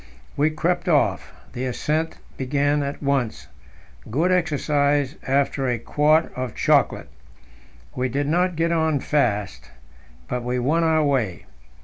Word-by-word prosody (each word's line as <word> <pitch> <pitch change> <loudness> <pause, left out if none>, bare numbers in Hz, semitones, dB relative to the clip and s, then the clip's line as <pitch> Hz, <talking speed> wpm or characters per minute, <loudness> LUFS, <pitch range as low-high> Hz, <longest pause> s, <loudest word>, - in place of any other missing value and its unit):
We 150 +2 +2
crept 175 +3 -1
off: 150 -4 +1 0.2
The 125 +1 -3
ascent 155 +5 -2 0.2
began 145 +2 0
at 140 +1 -4
once 135 -5 -1 0.6
good 160 +11 +1
exercise 145 -4 +1
after 135 0 +1
a 120 -1 0
quart 150 +7 +2
of 125 -2 -4
chocolate. - - +2 0.8
We 125 0 -1
did 140 +4 -1
not 180 +3 +1
get 165 +1 0
on 160 -3 +1
fast, 105 -9 -1 0.6
but 125 - -2
we 125 +1 -1
won 150 +7 +1
our 160 -1 +3
way. 125 -11 -1
145 Hz, 130 wpm, -23 LUFS, 130-160 Hz, 0.8 s, our